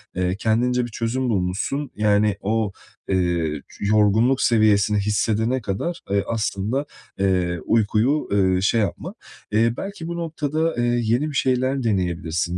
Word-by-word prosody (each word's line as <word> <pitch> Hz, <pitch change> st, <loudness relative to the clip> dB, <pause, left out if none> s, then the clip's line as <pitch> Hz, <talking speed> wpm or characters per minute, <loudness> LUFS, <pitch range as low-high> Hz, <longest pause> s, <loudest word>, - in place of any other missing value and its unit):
eee, 90 Hz, 0 st, 0 dB
kendince 120 Hz, +3 st, +1 dB
bir 120 Hz, -, -9 dB
çözüm 120 Hz, +3 st, -2 dB
bulmuşsun, 105 Hz, +8 st, -1 dB
yani 105 Hz, -1 st, +2 dB
o, 110 Hz, 0 st, 0 dB, 0.4 s
eee, 85 Hz, -5 st, 0 dB, 0.2 s
yorgunluk 110 Hz, +5 st, +3 dB
seviyesini 105 Hz, -2 st, +3 dB
hissedene 110 Hz, +4 st, 0 dB
kadar, 140 Hz, -, -3 dB
eee, 100 Hz, 0 st, +2 dB
aslında, 110 Hz, +4 st, -1 dB, 0.3 s
eee, 90 Hz, -3 st, +1 dB
uykuyu, 115 Hz, +6 st, +1 dB
eee, 95 Hz, -2 st, +2 dB
şey 110 Hz, +3 st, +2 dB
yapma. 100 Hz, -, -3 dB, 0.4 s
İii, 115 Hz, +2 st, +2 dB
belki 195 Hz, -4 st, -6 dB
bu 170 Hz, -, -4 dB
noktada, 160 Hz, -1 st, -1 dB
iii, 120 Hz, -1 st, 0 dB
yeni 140 Hz, +6 st, +1 dB
bir 145 Hz, -, -7 dB
şeyler 130 Hz, +1 st, +1 dB
deneyebilirsin, 90 Hz, -4 st, -1 dB
110 Hz, 135 wpm, -22 LUFS, 95-125 Hz, 0.4 s, yorgunluk